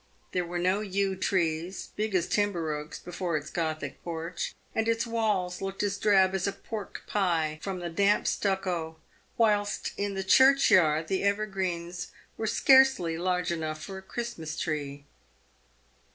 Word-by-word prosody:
There 180 - 0
were 175 +1 -3
no 185 +3 +2
yew 195 -1 0
trees, 175 -1 -1
big 210 -1 -1
as 175 -2 +2
timber 180 -7 0
oaks, 150 +1 -6
before 175 -2 -3
its 150 +1 -7
gothic 155 -4 -3
porch, 170 0 -4 0.2
and 225 0 0
its 230 +1 +1
walls 210 -6 -1
looked 195 +1 -3
as 200 -1 0
drab 190 -3 +4
as 190 0 0
a - - +1
pork 200 +1 -7
pie, 165 -6 0
from 195 -2 -3
the 175 -1 -4
damp 200 +4 +2
stucco, 180 -5 -1 0.4
whilst 210 -3 +1
in 200 -1 -2
the 195 - -2
churchyard 185 - +5
the 190 +2 0
ever 200 +1 +2
greens 180 -3 -3 0.3
were 220 - -3
scarcely 265 -10 +5
large 180 +1 0
enough 155 -2 -3
for 190 -1 -6
a - - -12
Christmas 190 -7 -5
tree. 145 -3 -3
185 Hz, 155 wpm, -28 LUFS, 165-205 Hz, 0.4 s, churchyard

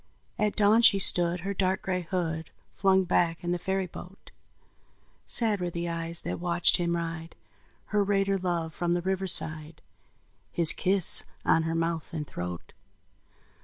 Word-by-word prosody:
At 210 -1 0
dawn 215 +2 +3
she 215 -4 +6
stood 175 -2 +5
her 200 +3 -4
dark 190 -1 -1
gray 185 -1 -2
hood 165 -2 -4 0.2
Flung 190 -1 +2
back 170 -1 -1
in 175 - -3
the 175 - -2
ferry 190 +2 -2
boat; 180 +2 -13 1.0
Sad 215 -5 +2
were 175 - -2
the 170 0 -5
eyes 165 0 -3
that - - -5
watched 175 0 +3
him 170 -1 -1
ride, 165 -1 -6 0.6
Her 205 -1 +2
raider 195 -1 0
love, 170 -3 -3
from 175 0 -2
the 175 0 -2
riverside, 165 -5 -2 0.7
His 165 -2 +3
kiss 190 -2 +3 0.2
on 165 - +3
her 165 - -3
mouth 165 -1 -3
and 150 -2 -4
throat. 90 - -8
175 Hz, 155 wpm, -27 LUFS, 165-190 Hz, 1.0 s, she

